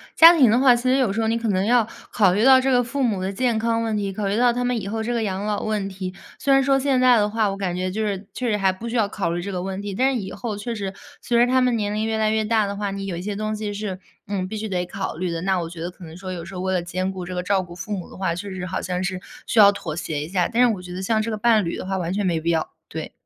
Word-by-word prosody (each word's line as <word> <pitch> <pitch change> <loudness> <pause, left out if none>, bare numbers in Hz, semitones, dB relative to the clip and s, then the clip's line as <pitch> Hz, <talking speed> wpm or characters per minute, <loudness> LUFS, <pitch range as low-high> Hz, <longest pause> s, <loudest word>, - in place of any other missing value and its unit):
家 330 +1 +10
庭 260 -7 +6
的 225 - +4
话， 260 -1 +6
其 240 0 -1
实 255 0 +3
有 255 -7 +2
时 220 +3 -1
候 220 - +1
你 225 +1 +1
可 230 -1 -2
能 190 -1 +1
要 235 0 +4 0.3
考 200 -5 +4
虑 210 +6 +2
到 265 -1 +8
这 265 +1 +1
个 250 -1 +4
父 265 +3 -2
母 210 -6 0
的 190 +1 -2
健 235 +1 +1
康 230 0 0
问 220 -2 -1
题， 200 -1 -2
考 205 +1 -3
虑 200 +2 0
到 245 0 +4
他 245 +1 -1
们 245 -1 0
以 195 - -6
后 220 +2 -2
这 240 +2 -2
个 235 - 0
养 200 -1 -2
老 210 -1 -1
问 210 -2 -1
题。 190 -1 -6 0.3
虽 275 - +2
然 270 0 +5
说 270 0 +3
现 265 -2 +2
在 250 -1 +6
的 210 -1 +2
话， 215 -1 +1
我 195 - -5
感 185 -3 -2
觉 185 +1 -2
就 215 +4 -3
是 200 -1 -3
确 250 -2 -2
实 215 - +2
还 195 -2 +2
不 185 +5 -7
需 235 - -4
要 225 -3 +3
考 190 -5 -2
虑 175 - -2
这 200 +3 -5
个 180 -2 -3
问 190 +1 -4
题， 205 -1 -5
但 260 +7 +2
是 250 - -1
以 190 - -6
后 230 -4 -4
确 235 +3 -4
实 200 -3 -4 0.3
随 240 - 0
着 240 - +6
他 255 +1 +3
们 250 -2 +2
年 205 -2 -1
龄 215 +1 -1
越 220 0 -1
来 215 0 +2
越 220 0 +1
大 220 -1 +2
的 200 0 -4
话， 205 -1 -2
你 195 0 -5
有 185 -3 -4
一 - - -5
些 205 +2 -4
东 215 +1 -2
西 210 -1 -4
是， 200 -2 -4 0.3
嗯， 190 -2 -2
必 215 - -6
须 215 0 -4
得 180 -2 -1
考 190 -1 -5
虑 180 +1 -2
的， 165 -1 -3
那 190 0 +1
我 165 -1 -4
觉 165 -1 -9
得 175 +2 -4
可 180 0 -13
能 160 0 -11
说 185 +1 -7
有 170 -2 -6
时 190 +3 -9
候 180 - -4
为 190 0 -1
了 180 - +1
兼 185 +2 -2
顾 185 -2 -6
这 180 +1 -6
个 180 - -2
照 195 +1 +2
顾 175 -1 -10
父 195 +4 -8
母 180 - -8
的 - - -12
话， 190 -3 -1
确 180 +4 -6
实 185 -1 -5
好 185 +1 -3
像 180 0 -2
是 185 0 -2 0.3
需 230 - +1
要 200 -1 +9
妥 170 -6 -5
协 155 -2 -3
一 155 - -8
下， 180 -2 +1
但 235 +1 +1
是 235 - +3
我 190 - -6
觉 180 0 -9
得 185 - -5
像 215 +3 +1
这 220 - -3
个 215 - -2
伴 220 -2 +3
侣 170 - -2
的 - - -6
话 190 0 -2
完 175 -1 -2
全 205 0 -1
没 170 -3 +1
必 165 +1 -2
要， 160 -2 0 0.2
对。 160 0 -6
205 Hz, 375 characters per minute, -23 LUFS, 185-230 Hz, 0.3 s, 家